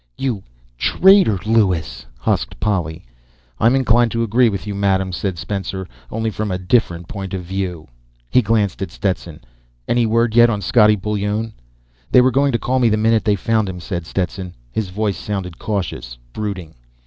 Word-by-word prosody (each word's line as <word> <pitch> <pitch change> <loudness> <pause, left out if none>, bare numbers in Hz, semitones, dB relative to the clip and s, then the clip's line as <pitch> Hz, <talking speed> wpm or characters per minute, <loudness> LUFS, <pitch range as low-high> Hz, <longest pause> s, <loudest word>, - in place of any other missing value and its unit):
"You... 120 -7 -2 0.4
traitor, 190 - +5
Lewis!" 90 - +1
husked - - -1
Polly. 85 -7 -2 0.5
"I'm 115 +4 +4
inclined 120 -2 +3
to 115 0 0
agree 115 +2 +3
with 100 -1 -4
you, 105 - -4
Madame," 95 -1 +1
said 95 0 -3
Spencer. 95 +1 -4 0.2
"Only 110 0 -2
from 105 +1 -3
a 90 - -1
different 90 -3 0
point 95 -1 -5
of 90 - -5
view." 90 -3 -4 0.4
He 125 - +4
glanced 105 -3 0
at 95 - -2
Stetson. 90 -5 -3 0.5
"Any 120 -1 +2
word 115 0 +2
yet 120 0 +7
on 105 -3 -1
Scottie 105 +2 +4
Bullone?" 105 +2 -2 0.6
"They 125 - +7
were 130 +1 +4
going 140 +2 +2
to 120 - +1
call 130 +2 0
me 120 -2 +4
the 110 - +2
minute 110 +1 +2
they 105 -2 +3
found 110 +1 0
him," 90 -1 -6
said 85 -2 -5
Stetson. 90 0 -3 0.2
His 105 - -2
voice 100 +1 -1
sounded 95 -4 -5
cautious, 90 - -4 0.2
brooding. 95 -6 -5
105 Hz, 170 wpm, -19 LUFS, 90-115 Hz, 0.6 s, yet